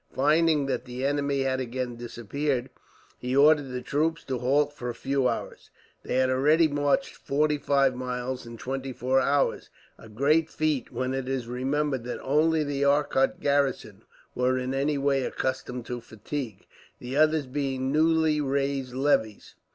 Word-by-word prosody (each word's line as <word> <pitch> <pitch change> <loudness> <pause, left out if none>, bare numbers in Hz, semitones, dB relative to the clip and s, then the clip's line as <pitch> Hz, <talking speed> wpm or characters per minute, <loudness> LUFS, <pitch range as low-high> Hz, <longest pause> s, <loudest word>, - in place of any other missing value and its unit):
Finding 150 +1 +3
that 135 - -2
the 125 +1 -4
enemy 140 -1 0
had 130 0 0
again 125 -1 -3
disappeared, 120 +3 -3 0.5
he 125 +1 -2
ordered 145 0 +5
the 125 -1 -5
troops 160 +3 0
to 130 -3 -3
halt 145 +4 +2
for 125 -4 -5
a 120 - -5
few 135 +2 0
hours. - - -4 0.3
They - - -3
had 130 0 +3
already 150 +5 +4
marched 145 +4 0
forty 150 +1 0
five 140 -2 +2
miles 125 0 -4
in 115 0 -9
twenty 135 +2 -4
four 130 +2 +1
hours, 140 +1 +1 0.3
a 110 - -13
great 150 +8 +2
feat 155 -5 -1
when 130 0 -2
it 135 -1 -3
is 135 -3 -2
remembered 135 +1 -1
that 125 - -4
only 155 +3 +2
the 140 -1 -2
Arcot 140 -1 +2
garrison 140 -7 0 0.3
were 125 +1 +1
in 130 +1 -2
any 140 +2 0
way 140 -1 +1
accustomed 125 -2 -3
to 120 0 -5
fatigue, 110 0 -6 0.3
the 125 +2 -6
others 155 0 +3
being 130 0 -2
newly 160 0 +3
raised 135 -2 -1
levies. 130 -6 0
135 Hz, 160 wpm, -27 LUFS, 125-145 Hz, 0.5 s, ordered